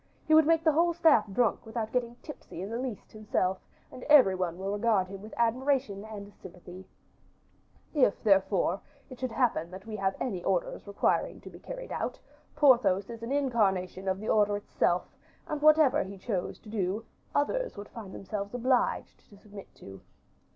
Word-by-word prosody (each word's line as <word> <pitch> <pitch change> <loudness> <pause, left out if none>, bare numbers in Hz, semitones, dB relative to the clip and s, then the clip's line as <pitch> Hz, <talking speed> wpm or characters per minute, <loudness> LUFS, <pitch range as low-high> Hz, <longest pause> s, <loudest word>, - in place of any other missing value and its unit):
He 315 - +2
would 315 -1 +7
make 325 0 +3
the 320 - +5
whole 340 +3 +2
staff 260 - +4
drunk, 235 +3 +1
without 220 -1 -4
getting 240 -1 -1
tipsy 240 - -9
in 200 - -6
the 230 - -3
least 250 -5 -6
himself, 190 -3 -1 0.3
and 255 - -10
every 280 -11 +7
one 180 -2 -2
will 195 +1 -3
regard 205 -2 +1
him 195 0 -8
with 215 +2 -10
admiration 245 -2 0
and 205 -2 -9
sympathy; 180 +1 -12 1.1
if, 270 -9 +2
therefore, 195 -2 +2 0.3
it 255 - -10
should 255 - -2
happen 225 -10 +1
that 190 +2 -10
we 220 -1 -6
have 195 -1 0
any 185 -8 -3
orders 190 +1 -1
requiring 200 - 0
to - - -11
be - - -13
carried - - -8
out, - - -3 0.4
Porthos 240 -9 +4
is 230 -1 -9
an 230 +3 -5
incarnation 200 -9 0
of 190 0 0
the 215 - -7
order 205 -1 +3
itself, 180 -3 0 0.4
and 300 -1 -4
whatever 305 -2 +5
he 195 +1 -9
chose 190 -2 -3
to 215 - -13
do 210 +1 -2 0.3
others - - 0
would 205 0 -8
find 215 -5 -9
themselves 200 +3 -5
obliged 250 0 0
to 205 - -16
submit 200 -1 -12
to." 95 0 -12
215 Hz, 180 wpm, -29 LUFS, 195-255 Hz, 1.1 s, would